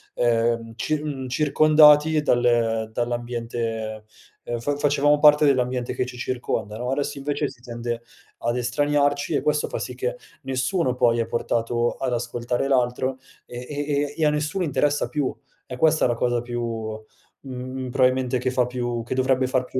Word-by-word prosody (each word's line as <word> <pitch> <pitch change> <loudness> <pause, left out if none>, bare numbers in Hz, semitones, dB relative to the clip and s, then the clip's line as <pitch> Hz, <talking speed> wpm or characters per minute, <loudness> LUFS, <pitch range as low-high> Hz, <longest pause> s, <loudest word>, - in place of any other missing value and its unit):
ehm, 115 -1 +1
cir 150 +5 -2
mhmm, 135 -3 -4
circondati 150 +2 +5
dal, 120 -4 +2
ehm, 115 -2 +1
dall'ambiente, 115 -2 -3 0.4
ehm, 120 - -3
fa 145 +5 -1
facevamo 145 0 +3
parte 150 0 +6
dell'ambiente 125 -3 +1
che 130 - -2
ci 125 - -9
circonda 120 -4 -3
no, 125 +2 -3
adesso 140 +1 -2
invece 145 +1 -1
si 130 -3 -16
tende 120 -1 -5 0.4
ad 120 +1 -1
estraniarci 145 +4 +1
e - - +1
questo 150 0 +1
fa - - -3
sì - - -5
che - - -3 0.2
nessuno 130 +2 -1
poi 120 -1 +3
è 115 - 0
portato 120 +1 0
ad 130 - -3
ascoltare 120 +2 -2
l'altro, 130 0 0 0.3
e 120 - -8
e 145 0 -2
e 160 - +2
a - - +5
nessuno 150 +5 -1
interessa 145 -1 0
più, 145 -4 -1 0.3
è 125 -2 -7
questa 160 0 +3
la 120 - 0
cosa 120 0 0
più, 120 0 -5 0.8
mhmm, 130 0 -6
probabilmente, 130 -1 +2
che 130 - -1
fa 125 -1 +2
più 120 -1 -3
che 120 - -4
dovrebbe 130 0 +2
far 130 -1 +1
più 130 - -3
130 Hz, 165 wpm, -23 LUFS, 120-145 Hz, 0.8 s, parte